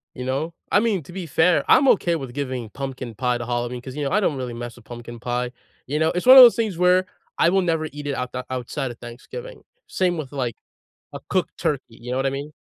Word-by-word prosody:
You 125 Hz, -, -6 dB
know? 145 Hz, +6 st, -2 dB, 0.2 s
I 205 Hz, -, +5 dB
mean, 210 Hz, -8 st, 0 dB
to 175 Hz, -, -13 dB
be 185 Hz, -2 st, -5 dB
fair, 165 Hz, +3 st, +3 dB
I'm 275 Hz, +1 st, +6 dB
okay 170 Hz, -3 st, +3 dB
with 135 Hz, -5 st, -6 dB
giving 130 Hz, -5 st, -4 dB
pumpkin 130 Hz, -4 st, -6 dB
pie 125 Hz, 0 st, 0 dB
to 120 Hz, -, -5 dB
Halloween 120 Hz, 0 st, -3 dB
'cause, 130 Hz, +1 st, -9 dB
you 150 Hz, -, -3 dB
know, 140 Hz, -, -2 dB
I 210 Hz, -, +3 dB
don't 165 Hz, -8 st, +1 dB
really 125 Hz, -2 st, -4 dB
mess 120 Hz, 0 st, -7 dB
with 120 Hz, -2 st, -18 dB
pumpkin 120 Hz, -1 st, -9 dB
pie, 125 Hz, +1 st, -2 dB, 0.3 s
you 150 Hz, +4 st, -2 dB
know? 160 Hz, 0 st, +3 dB
It's 180 Hz, -, -3 dB
one 260 Hz, +1 st, +10 dB
of 255 Hz, -, +13 dB
those 235 Hz, -, +8 dB
things 215 Hz, -7 st, -1 dB
where 180 Hz, +1 st, +4 dB, 0.3 s
I 170 Hz, -, +4 dB
will 190 Hz, +1 st, +3 dB
never 165 Hz, -3 st, 0 dB
eat 145 Hz, 0 st, -7 dB
it 140 Hz, -, -1 dB
out 125 Hz, 0 st, -4 dB
the 125 Hz, 0 st, -4 dB
outside 130 Hz, +1 st, -3 dB
of 115 Hz, -, -11 dB
Thanksgiving. 475 Hz, -, -9 dB, 0.3 s
Same 180 Hz, -2 st, 0 dB
with, 145 Hz, -3 st, -6 dB
like, 125 Hz, -5 st, -3 dB, 0.6 s
a -, -, -7 dB
cooked -, -, -1 dB
turkey, 140 Hz, -3 st, 0 dB
you 120 Hz, +2 st, -10 dB
know 125 Hz, -, -1 dB
what 135 Hz, -, 0 dB
I -, -, +2 dB
mean? 140 Hz, +2 st, -6 dB
135 Hz, 255 wpm, -23 LUFS, 125-175 Hz, 0.6 s, of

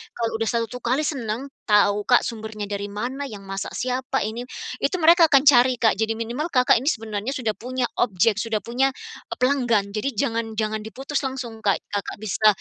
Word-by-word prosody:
kalau 230 Hz, -1 st, -1 dB
udah 225 Hz, -, 0 dB
satu 235 Hz, +1 st, -2 dB
kali 255 Hz, +5 st, 0 dB
seneng 265 Hz, -2 st, -3 dB, 0.2 s
tahu, 205 Hz, -1 st, +3 dB
Kak, 245 Hz, -, +5 dB
sumbernya 220 Hz, -2 st, -5 dB
dari 200 Hz, 0 st, -3 dB
mana, 250 Hz, +7 st, -4 dB
yang 205 Hz, -5 st, -9 dB
masak 195 Hz, 0 st, -5 dB
siapa 255 Hz, -3 st, -1 dB
ini 230 Hz, +4 st, -4 dB, 0.3 s
itu -, -, 0 dB
mereka 335 Hz, +1 st, +7 dB
akan 275 Hz, -3 st, +5 dB
cari, 255 Hz, -3 st, +6 dB
Kak. 225 Hz, -1 st, +3 dB
Jadi 220 Hz, 0 st, +1 dB
minimal 240 Hz, +7 st, -3 dB
Kakak 250 Hz, -2 st, +5 dB
ini 265 Hz, -, -6 dB
sebenarnya 220 Hz, 0 st, -3 dB
sudah 240 Hz, -5 st, -1 dB
punya 255 Hz, +1 st, -3 dB, 0.2 s
objek, 210 Hz, -1 st, +2 dB
sudah 220 Hz, -2 st, -1 dB
punya 250 Hz, +3 st, +1 dB, 0.4 s
e -, -, -4 dB
pelanggan, 245 Hz, -6 st, +2 dB
jadi 215 Hz, +6 st, -1 dB
jangan 225 Hz, +1 st, -1 dB
jangan 215 Hz, 0 st, -1 dB
diputus 270 Hz, +6 st, -3 dB
langsung, 255 Hz, -4 st, -5 dB
Kak. 205 Hz, -3 st, +2 dB
Kakak 205 Hz, -1 st, -3 dB
bisa 215 Hz, +1 st, +2 dB
230 Hz, 185 wpm, -23 LUFS, 215-255 Hz, 0.4 s, mereka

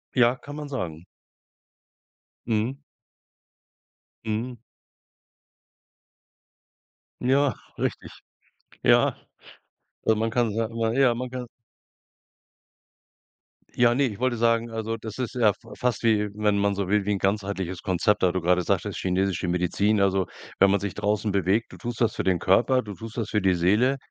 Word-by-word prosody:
Ja, 125 Hz, 0 st, +4 dB
kann 145 Hz, +3 st, -10 dB
man 150 Hz, -1 st, -6 dB
sagen. 85 Hz, -, -5 dB, 1.4 s
Mhm. 115 Hz, +4 st, 0 dB, 1.5 s
Mhm. 115 Hz, +3 st, -3 dB, 2.6 s
Ja, 135 Hz, +1 st, +3 dB, 0.2 s
richtig. -, -, -3 dB, 0.7 s
Ja. -, -, +4 dB, 1.0 s
Man 115 Hz, +1 st, 0 dB
kann 115 Hz, -2 st, +1 dB
sa 115 Hz, 0 st, 0 dB, 0.2 s
ja, 130 Hz, -1 st, +4 dB
man 125 Hz, +2 st, -4 dB
kann 125 Hz, -1 st, -5 dB, 2.3 s
Ja, 120 Hz, -1 st, +4 dB
ne, 140 Hz, +4 st, +2 dB
ich 105 Hz, -3 st, -7 dB
wollte 130 Hz, -2 st, 0 dB
sagen, 115 Hz, 0 st, +2 dB
also 115 Hz, 0 st, -3 dB
das 110 Hz, +2 st, -8 dB
ist 125 Hz, 0 st, -3 dB
ja 115 Hz, -4 st, +4 dB
f 105 Hz, -, -2 dB, 0.2 s
fast 125 Hz, -3 st, -1 dB
wie 105 Hz, -2 st, +2 dB
wenn 105 Hz, -1 st, +1 dB
man 100 Hz, 0 st, +2 dB
so 100 Hz, -1 st, -2 dB
will, 105 Hz, 0 st, +1 dB
wie 105 Hz, -, 0 dB
'n 100 Hz, -, 0 dB
ganzheitliches 95 Hz, -3 st, -2 dB
Konzept, 95 Hz, +1 st, +1 dB
da 90 Hz, -, +4 dB
du 95 Hz, 0 st, -2 dB
gerade 90 Hz, +1 st, +2 dB
sagtest, -, -, -1 dB
chinesische 95 Hz, 0 st, 0 dB
Medizin. 95 Hz, +4 st, +1 dB
Also, 95 Hz, -1 st, +2 dB, 0.3 s
wenn 100 Hz, 0 st, +6 dB
man 100 Hz, -, +3 dB
sich 100 Hz, 0 st, -4 dB
draußen 105 Hz, 0 st, 0 dB
bewegt, 100 Hz, +3 st, +1 dB
du -, -, -11 dB
tust 120 Hz, -1 st, -6 dB
das 115 Hz, -, +2 dB
für -, -, -2 dB
den 95 Hz, -2 st, +2 dB
Körper, 120 Hz, +9 st, +3 dB
du 105 Hz, -4 st, -8 dB
tust 115 Hz, +3 st, -9 dB
das 115 Hz, -3 st, -2 dB
für 105 Hz, -, +1 dB
die 95 Hz, -1 st, +3 dB
Seele, 105 Hz, +10 st, +2 dB
105 Hz, 145 wpm, -25 LUFS, 95-120 Hz, 2.6 s, wenn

